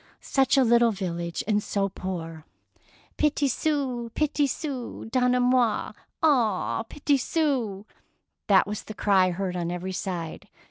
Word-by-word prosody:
Such 270 0 +2
a 265 - +6
little 235 0 +5
village, 170 -4 -3
and 210 -1 +2
so 200 -1 -1
poor! 165 -4 -6 0.7
"Petit 295 -1 +2
sou, 260 -4 -1
petit 295 -1 +1
sou, 270 -4 -5
donnez 250 0 +3
moi 245 -3 +2 0.3
un 230 -8 +2
petit 285 +3 0
sou 250 -10 -1
I - - -31 0.5
That 195 -2 +5
was 210 +1 -4
the 215 - -8
cry 190 -3 +3
heard 180 0 -3
on 170 -1 -2
every 180 +2 -4
side. 175 -3 -5
225 Hz, 140 wpm, -26 LUFS, 190-265 Hz, 0.7 s, a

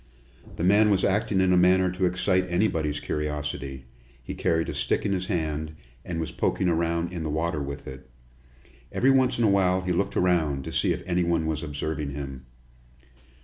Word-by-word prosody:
The - - -4
man 105 +4 +5
was 100 -2 +2
acting 100 -1 +1
in 95 -1 +3
a - - +4
manner 90 0 +4
to 90 +1 -1
excite 90 +1 +1
anybody's 80 -6 0
curiosity. 75 -3 -4 0.4
He - - -6
carried 80 0 0
a - - -3
stick - - -1
in 100 - 0
his 95 -1 -1
hand, 80 -4 -2 0.3
and 85 -2 -4
was 80 - -3
poking 95 - 0
around 85 +1 0
in 85 - -4
the 80 - -3
water 80 0 -1
with 70 0 -6
it. 65 -1 -10 0.8
Every 135 +2 +3
once 130 -1 +3
in 120 - +1
a - - +5
while 95 -2 +3
he 90 0 -2
looked 90 +3 -1
around, 80 -7 +1
to - - -6
see - - +2
if - - -3
anybody 85 -2 +1
was 80 -1 -2
observing 75 -2 -4
him. 70 -3 -7
85 Hz, 190 wpm, -26 LUFS, 75-95 Hz, 0.8 s, man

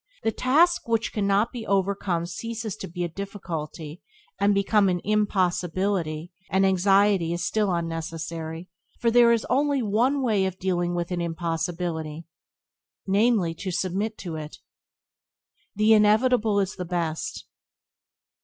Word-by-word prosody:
The 225 - +2
task 320 +9 +3
which 225 -1 0
cannot 200 +2 +1
be 240 -3 -6
overcome 195 -3 0
ceases 220 +4 -5
to - - -6
be 175 +1 -4
a - - 0
difficulty, 165 -4 -6 0.4
and 200 +1 +3
becomes 200 0 +3
an 180 -1 -1
impossibility; 185 -4 0 0.2
and 190 +1 +3
anxiety 195 -2 +3
is 175 - -2
still 210 -3 +1
unnecessary, 165 0 -4 0.3
for 230 - +2
there 235 0 +6
is 230 -1 +1
only 280 -1 +1
one 245 +7 +1
way 210 -6 +2
of 190 -1 -5
dealing 175 -2 -1
with 175 +1 -3
an 175 -1 -1
impossibility 165 -1 -3 0.4
— - - -68 0.2
namely, 200 -3 +2
to 185 +3 -6
submit 190 +5 -2
to 165 -4 -6
it. 155 0 -8 1.2
The 215 +2 +4
inevitable 215 0 +4
is 195 0 -2
the 180 - -3
best. 170 -2 -3
190 Hz, 135 wpm, -25 LUFS, 170-215 Hz, 1.2 s, there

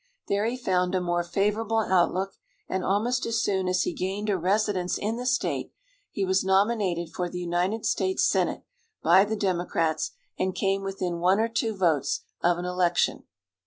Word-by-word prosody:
There 200 +2 +1
he 245 +2 -2
found 185 -6 0
a - - +2
more 175 -1 0
favorable 210 +5 0
outlook, 190 -2 +2 0.4
and 190 -1 -2
almost 230 +7 0
as 230 -1 0
soon 190 -2 0
as 185 0 +2
he - - -2
gained 195 +4 -2
a - - +2
residence 190 0 0
in 220 +3 -2
the 250 +1 -4
state 245 - 0 0.4
he 195 - -2
was 190 0 +2
nominated 190 -3 +1
for 180 -1 -2
the 180 - -6
United 180 +5 -1
States 375 0 +1
Senate - - 0 0.4
by 190 +2 +6
the 220 +1 -2
Democrats, 175 -5 0 0.3
and 185 0 0
came 195 0 0
within 185 -3 -3
one 185 +4 +3
or 225 - +2
two 225 -2 -1
votes 155 -6 +1 0.2
of 175 0 +3
an 175 - -4
election. 180 -1 +1
190 Hz, 175 wpm, -26 LUFS, 180-210 Hz, 0.4 s, by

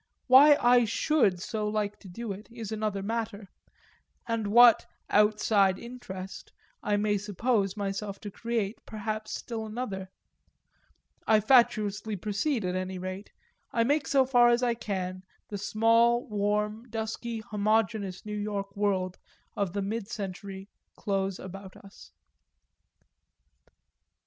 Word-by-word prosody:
Why 285 +3 +8
I 245 0 +5
should 225 - +2
so 210 +3 -3
like 210 -1 -2
to 200 - -13
do 215 +5 -6
it 200 +3 -8
is 230 -3 -7
another 210 -2 -2
matter 220 -2 -4 0.8
and 230 -2 -1
what 235 +2 +7 0.2
"outside 210 -2 +3
interest" 215 -6 -8 0.3
I 205 0 +1
may 205 0 +1
suppose 205 0 0
myself 200 0 -4
to 205 - -7
create 225 -1 -2
perhaps 215 0 -4
still 230 -2 -5
another: 215 -4 -5 1.2
I 220 -1 +5
fatuously 215 -3 +3
proceed 215 - -1
at 180 - -1
any 185 0 -3
rate, 185 +2 -6 0.4
I 230 - +2
make 285 +4 +1
so 270 -2 +4
far 245 -2 +5
as 240 +1 +2
I 240 -1 +2
can 185 -5 -4 0.3
the 205 - -5
small 230 +3 +3
warm 210 +2 -1
dusky 225 +1 -4
homogeneous 210 -2 -1
New 210 - -5
York 200 -1 -4
world 190 -3 -1 0.4
of 200 -3 -1
the 200 -1 -1
mid 210 +1 -3
century 195 -2 -6 0.3
close 195 -2 -2
about 190 +1 -10
us. 195 0 -15
210 Hz, 130 wpm, -28 LUFS, 195-230 Hz, 1.2 s, Why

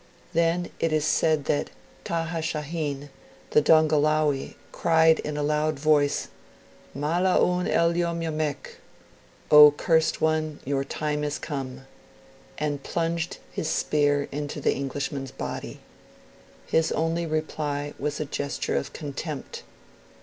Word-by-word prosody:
Then 170 +1 +1
it 165 - +1
is 155 -1 +1
said 155 -1 +2
that 145 - 0 0.4
Taha 165 0 -2
Shahin, 150 -3 -3 0.4
the 150 - +5
Dongolawi, 155 -2 +3 0.2
cried 160 -1 +4
in 150 0 -4
a 150 - -1
loud 150 0 0
voice, 145 -1 +2 0.7
'Mala' 170 +6 +2
oun 180 0 +2
el 170 0 +2
yom 170 -1 -1
yomek!' 155 -3 -3 0.7
(O 150 0 +11
cursed 160 +2 +1
one, 155 -1 0
your 135 0 0
time 150 +1 -2
is 145 -1 -2
come), 135 -3 -6 0.7
and 145 -2 -2
plunged 170 +2 -2
his 160 - -3
spear 145 -2 +1
into 145 +1 -4
the - - +2
Englishman's 135 0 -4
body. - - -6 0.8
His 160 0 +1
only 165 +1 0
reply 150 -2 -2
was 150 -1 -2
a 155 - -1
gesture 140 0 -3
of - - -2
contempt. 145 -1 -6
155 Hz, 125 wpm, -26 LUFS, 145-160 Hz, 0.8 s, O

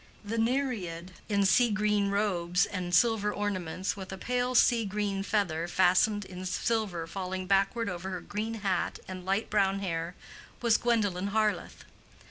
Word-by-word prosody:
The 225 +2 -2
Nereid 225 -9 -1 0.2
in 200 -1 +2
sea 235 +6 +5
green 210 -1 +1
robes 180 -4 +1
and 180 -2 -4
silver 215 0 +3
ornaments, 190 -3 -2
with 190 -2 -8
a 190 - -5
pale 250 +4 -1
sea 235 -1 +5
green 200 -1 -2
feather 180 -5 0
fastened 190 +3 +3
in 185 0 -8
silver 190 -3 -1
falling 185 +2 -4
backward 200 +4 +2
over 180 0 -4
her 185 -2 -4
green 220 +2 -4
hat 185 -3 0
and 185 -1 -7
light 195 +3 -1
brown 195 -2 +2
hair, 170 -2 -3 0.4
was 235 -3 +3
Gwendolen 205 -6 +1
Harleth. 215 0 -1
200 Hz, 150 wpm, -29 LUFS, 185-215 Hz, 0.4 s, sea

